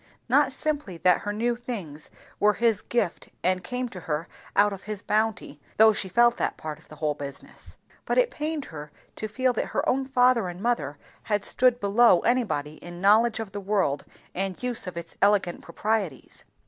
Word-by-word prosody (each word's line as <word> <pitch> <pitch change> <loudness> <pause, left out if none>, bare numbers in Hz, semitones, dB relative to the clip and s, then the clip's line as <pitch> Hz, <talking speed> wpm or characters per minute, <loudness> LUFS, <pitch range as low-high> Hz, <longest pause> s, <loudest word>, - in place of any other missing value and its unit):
Not 270 +2 +4
simply 285 - -1
that 180 +2 +4
her 205 - -3
new 235 +3 0
things 195 - -7 0.3
were 210 0 +4
his 225 -1 +2
gift 210 -8 -2
and 185 +1 +1
came 250 +3 -3
to 190 - -8
her 165 0 -3 0.3
out 205 0 +4
of 195 - -10
his 210 -1 -3
bounty, 215 -9 -1 0.2
though 220 0 +7
she 195 -2 -2
felt 240 +5 +4
that - - -1
part 155 -1 -6
of - - -19
the 155 - -12
whole 150 0 -1
business; 140 -1 -9 0.3
but - - 0
it - - +4
pained 305 -1 -3
her 150 -1 -8 0.2
to 215 - -4
feel 255 +4 +1
that - - -2
her - - +1
own 265 +1 +1
father 250 -5 +3
and 175 0 -7
mother 190 - -1 0.3
had 210 -2 0
stood 250 -1 +3
below 205 -2 +5
anybody 155 - 0
in 175 0 -10
knowledge 220 +4 +4
of 220 -3 -5
the 205 +1 -5
world 190 -8 0 0.3
and 190 +3 -3
use 245 -6 -1
of 180 - -6
its 170 0 -7
elegant 200 -4 +2
proprieties. 195 - -3
205 Hz, 190 wpm, -26 LUFS, 175-240 Hz, 0.3 s, though